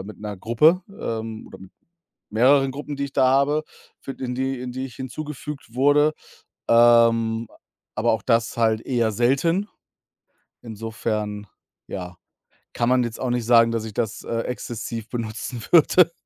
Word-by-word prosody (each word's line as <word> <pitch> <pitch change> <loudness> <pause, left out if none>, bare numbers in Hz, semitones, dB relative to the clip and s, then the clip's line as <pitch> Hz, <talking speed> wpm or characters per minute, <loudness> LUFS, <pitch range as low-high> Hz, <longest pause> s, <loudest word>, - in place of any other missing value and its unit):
äh, - - -7
mit 105 - -10
'ner 105 -2 -5
Gruppe 150 - +3
ähm, 115 - -5
oder - - -12
mit 95 -1 -14 0.6
mehreren 135 +5 +4
Gruppen, 145 +2 -6
die 140 - -2
ich 140 - -7
da 130 -1 +3
habe, 140 +3 +2 0.4
fü 135 - -6
in 125 -2 -5
die 130 -1 -2
in 125 -1 -5
die 130 +1 -4
ich 125 - -13
hinzugefügt 140 -1 -7
wurde. 145 +3 +4 0.6
Ähm, 115 -1 +4 0.5
aber 115 +2 +2
auch 110 - -1
das 115 -1 +1
halt 110 -1 +1
eher 120 -4 0
selten. 150 - +1 1.0
Insofern 110 -2 -4 0.4
ja, 90 -1 -7 0.6
kann 120 - 0
man 125 -1 +3
jetzt 115 -1 -5
auch 130 - -1
nicht 120 -2 -1
sagen, 115 -1 +5
dass 115 -1 -2
ich, 110 - -7
äh, - - -27
das 115 -1 -3
exzessiv 115 -1 -4
benutzen 115 0 -5
würde. 170 +1 +6
120 Hz, 160 wpm, -23 LUFS, 110-135 Hz, 1.0 s, würde